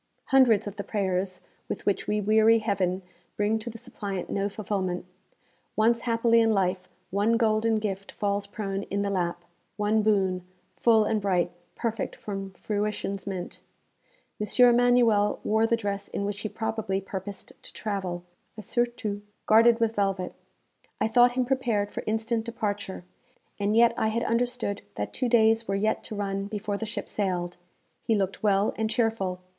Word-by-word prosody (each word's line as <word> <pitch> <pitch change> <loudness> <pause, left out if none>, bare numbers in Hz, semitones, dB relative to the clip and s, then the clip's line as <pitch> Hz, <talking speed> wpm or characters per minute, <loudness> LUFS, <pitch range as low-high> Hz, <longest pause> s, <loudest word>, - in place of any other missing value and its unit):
Hundreds 255 -6 +5
of 205 0 -6
the 200 - -3
prayers 190 -3 -1 0.3
with - - -4
which 200 - 0
we 210 0 +1
weary 220 +2 +5
Heaven 195 -4 0 0.3
bring 210 +2 +1
to 220 - -6
the 230 - -8
suppliant 205 -6 -5
no 200 +1 0
fulfilment. 195 -4 -3 0.7
Once 230 +2 +3
haply 230 0 +4
in 225 -1 +3
life 185 -1 0 0.2
one 210 +4 +2
golden 225 0 +2
gift 195 -2 -3
falls 200 0 -1
prone 195 -1 -3
in 200 +1 0
the 200 - -1
lap 175 -2 -1 0.3
one 210 +1 +2
boon 195 -4 +2 0.3
full 225 -2 +4
and 215 0 0
bright, 180 -3 +1 0.2
perfect 225 -3 -2
from 195 -2 -5
Fruition's 205 0 -3
mint. 185 -2 -5 0.8
M. 245 +3 +5
Emanuel 235 -4 +4
wore 220 +1 +2
the 230 - +2
dress 200 -2 -3
in 200 - -3
which 200 -1 -3
he 215 - -3
probably 220 -3 -2
purposed 195 0 -7
to - - -10
travel 190 -5 -3 0.3
a 215 - -7
surtout, 235 -4 -1 0.2
guarded 230 +2 +6
with 225 -1 +2
velvet. 195 -3 -1 0.7
I - - +2
thought 245 +2 +5
him 255 0 +1
prepared 240 -6 0
for - - -4
instant 225 +1 0
departure, 205 -5 -3 0.6
and 205 +1 +1
yet 235 0 +6
I 220 - +2
had 225 +2 0
understood 235 -3 -1
that 105 - -4
two 250 -2 -1
days 225 -1 +4
were 195 - 0
yet 215 +2 0
to 215 - -6
run 195 -1 -2
before 205 0 -3
the 225 - -4
ship 210 - -5
sailed. 180 -4 -2 0.4
He 225 - +1
looked 195 -2 -1
well 200 -1 +2
and 220 0 0
cheerful. 215 -5 0
210 Hz, 165 wpm, -27 LUFS, 195-225 Hz, 0.8 s, guarded